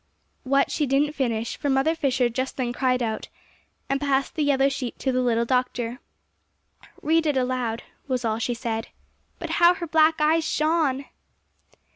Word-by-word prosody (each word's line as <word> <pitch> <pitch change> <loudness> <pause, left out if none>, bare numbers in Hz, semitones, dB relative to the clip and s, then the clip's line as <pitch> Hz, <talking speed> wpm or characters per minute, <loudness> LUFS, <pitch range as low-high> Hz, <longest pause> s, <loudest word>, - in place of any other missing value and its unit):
What, 275 +1 +1
she 295 - 0
didn't 285 +3 +2
finish; 235 -5 -2
for 285 - -2
Mother 270 +4 +2
Fisher 265 -6 +1
just 260 +3 -3
then 245 -2 -1
cried 255 -1 +1
out, 220 -1 -3 0.6
and 275 +1 -1
passed 275 -1 0
the 315 - -2
yellow 275 -1 +3
sheet 270 -3 -4
to 265 - -1
the 255 0 +1
little 235 -2 +1
doctor. 250 -1 -1 1.0
"Read 320 +1 +2
it 290 -3 +1
aloud," 250 -3 -1 0.2
was 255 -3 -1
all 220 0 0
she 240 +1 -1
said. 225 -2 -3 0.5
But - - -5
how 345 +1 +7
her 350 - -5
black 320 0 +4
eyes 315 +2 +3
shone! 305 -4 0
265 Hz, 165 wpm, -24 LUFS, 245-295 Hz, 1.0 s, how